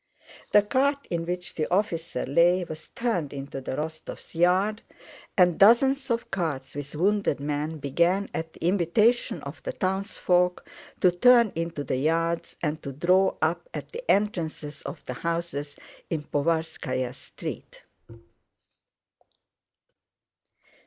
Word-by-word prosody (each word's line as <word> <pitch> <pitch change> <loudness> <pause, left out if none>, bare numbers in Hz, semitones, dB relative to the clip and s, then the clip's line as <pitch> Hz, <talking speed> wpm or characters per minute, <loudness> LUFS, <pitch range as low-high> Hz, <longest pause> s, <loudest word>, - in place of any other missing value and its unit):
The 210 - +6
cart 280 +5 +1
in 165 -1 -2
which 180 0 -4
the 155 - -1
officer 170 -8 0
lay 170 +6 +4
was 160 -2 -8
turned 180 - -2
into 135 -1 -6
the 130 - -4
Rostóvs' 155 +3 -6
yard, 185 +6 +2 0.6
and 180 -3 +4
dozens 265 +6 +5
of 235 0 -1
carts 145 -8 -2
with 145 +1 -7
wounded 200 -2 +1
men 150 +2 -2
began 170 +8 +1
at 160 0 -4
the - - -6
invitation 205 +6 +2
of - - -8
the - - -4
townsfolk 185 -2 0 0.3
to 180 - +6
turn 235 +4 +5
into 165 -3 -3
the 130 - -1
yards 165 +4 0
and 155 0 -1
to 140 - -5
draw 180 +7 +3
up - - 0
at - - -6
the 485 - -7
entrances 160 -7 0
of - - -8
the 125 - -4
houses 165 -1 -3 0.3
in 160 -3 -2
Povarskáya 145 -4 -1
Street. 135 - -8
170 Hz, 130 wpm, -26 LUFS, 150-200 Hz, 0.6 s, The